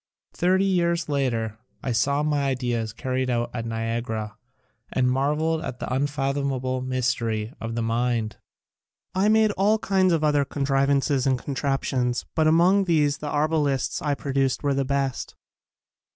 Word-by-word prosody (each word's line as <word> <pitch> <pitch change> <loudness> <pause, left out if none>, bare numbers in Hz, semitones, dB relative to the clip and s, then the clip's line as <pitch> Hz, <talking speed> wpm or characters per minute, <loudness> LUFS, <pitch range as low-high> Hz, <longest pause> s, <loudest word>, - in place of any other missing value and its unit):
Thirty 185 +2 +2
years 170 -3 +1
later 115 -6 -1 0.2
I 130 - -1
saw 140 +6 +1
my 145 -2 +1
ideas 120 -4 -1
carried 130 +3 -2
out 120 -1 -1
at 115 -1 -4
Niagara 115 -1 -3 0.6
and 130 -1 +1
marveled 150 +5 +1
at 125 - -5
the - - -3
un 135 +3 +1
fathomable 135 -2 -1
mystery 120 -3 -1
of 115 0 -4
the 115 - -1
mind. 115 -1 -1 0.8
I 195 +3 +2
made 220 -1 +4
all 205 +2 +2
kinds 190 -3 +2
of 165 -2 +1
other 150 -2 +3
contrivances 140 0 +1
and 130 -1 +3
contraptions 135 -2 -1
but 160 -1 +2
among 180 +5 +4
these 150 -4 +2
the 150 - -4
ar 150 +1 +1
balists 145 -5 0
I 145 -2 +1
produced 135 -1 -1
were 140 -1 +2
the 135 0 +1
best. 135 -1 -2
135 Hz, 150 wpm, -25 LUFS, 125-150 Hz, 0.8 s, made